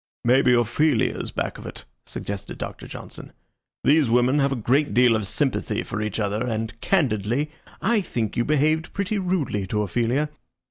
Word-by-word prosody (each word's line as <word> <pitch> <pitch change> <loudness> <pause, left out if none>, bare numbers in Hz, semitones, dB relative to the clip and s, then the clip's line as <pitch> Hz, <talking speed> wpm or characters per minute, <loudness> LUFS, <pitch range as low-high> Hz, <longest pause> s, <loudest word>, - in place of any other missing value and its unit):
"Maybe 125 +1 +4
Ophelia 120 +3 +2
is - - -4
back - - -3
of - - -8
it," - - -8 0.2
suggested 100 -1 -6
Doctor - - -6
Johnson. - - -9 0.5
"These 150 -3 +4
women 125 +4 +3
have 140 0 +2
a - - +1
great 135 +5 +1
deal 125 -2 +6
of 110 -3 -1
sympathy 135 +5 -1
for 110 - -4
each 110 0 -2
other, 105 +2 0
and, 110 -2 -2
candidly, 135 - +1 0.3
I 225 -2 +3
think 115 - -3
you 120 - +2
behaved 155 +3 +1
pretty 200 +1 -1
rudely 165 - -1
to 105 +2 0
Ophelia. 120 +9 0
125 Hz, 170 wpm, -24 LUFS, 110-150 Hz, 0.5 s, deal